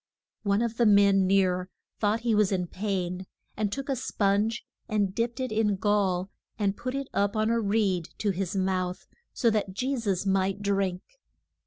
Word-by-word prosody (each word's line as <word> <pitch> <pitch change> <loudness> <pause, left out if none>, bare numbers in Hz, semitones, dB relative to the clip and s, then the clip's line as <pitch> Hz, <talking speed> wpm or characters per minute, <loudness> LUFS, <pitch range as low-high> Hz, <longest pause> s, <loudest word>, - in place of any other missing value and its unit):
One 200 +2 +1
of 230 -1 -3
the 235 - +4
men 200 -2 +5
near 185 -1 +2 0.3
thought 215 +2 +1
he 235 -1 +1
was 210 -2 +3
in 180 -2 0
pain, 185 -1 -3 0.3
and 215 0 0
he - - -5
took 275 +6 -5
a 275 - 0
sponge 210 0 0 0.2
and 205 -3 +1
dipped 235 +4 -2
it 255 -2 -2
in 215 0 +2
the 205 - +2
gall, 195 -2 +1 0.3
and 200 -2 0
put 255 +4 -4
it 275 -1 -3
up 200 +1 +1
on 215 +1 +1
a 235 - +2
reed 200 -5 +1
to 205 - 0
his 190 0 -3
mouth, 185 -1 -1 0.3
so 235 -3 +2
that 210 -3 -1
Je 260 +7 -1
sus 200 -6 -1
might 195 +1 +1
drink. 195 -2 0
200 Hz, 190 wpm, -27 LUFS, 190-220 Hz, 0.3 s, men